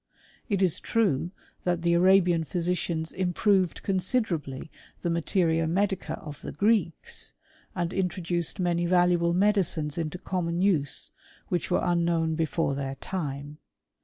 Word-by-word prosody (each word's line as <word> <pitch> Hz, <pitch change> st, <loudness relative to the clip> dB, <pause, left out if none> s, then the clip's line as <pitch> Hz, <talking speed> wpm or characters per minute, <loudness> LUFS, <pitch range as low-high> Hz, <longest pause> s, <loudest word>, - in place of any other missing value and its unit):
It 200 Hz, -2 st, +2 dB
is 180 Hz, -4 st, +1 dB
true 175 Hz, -8 st, +1 dB, 0.3 s
that 175 Hz, -1 st, 0 dB
the 170 Hz, 0 st, +3 dB
Arabian 175 Hz, -1 st, +4 dB
physicians 170 Hz, 0 st, -2 dB
improved 185 Hz, 0 st, +1 dB
con 195 Hz, -1 st, 0 dB
siderably 170 Hz, -, -2 dB, 0.3 s
the 170 Hz, -, 0 dB
materia 165 Hz, -1 st, +1 dB
medica 190 Hz, +3 st, 0 dB
of 150 Hz, -2 st, -9 dB
the -, -, -6 dB
Greeks, 205 Hz, -6 st, 0 dB, 0.4 s
and 175 Hz, 0 st, -2 dB
in 190 Hz, -1 st, +1 dB
troduced 175 Hz, -1 st, -3 dB
many 175 Hz, -2 st, +1 dB
valuable 175 Hz, -1 st, +3 dB
medicines 175 Hz, -6 st, +1 dB
into 160 Hz, +1 st, -3 dB
common 175 Hz, -2 st, -2 dB
use 175 Hz, -8 st, +1 dB, 0.4 s
which 175 Hz, -, -1 dB
Were 180 Hz, -, +2 dB
unknown 170 Hz, -2 st, +1 dB
before 160 Hz, -2 st, 0 dB
their 135 Hz, -1 st, -3 dB
time. 145 Hz, -3 st, -5 dB
175 Hz, 135 wpm, -27 LUFS, 160-185 Hz, 0.4 s, Arabian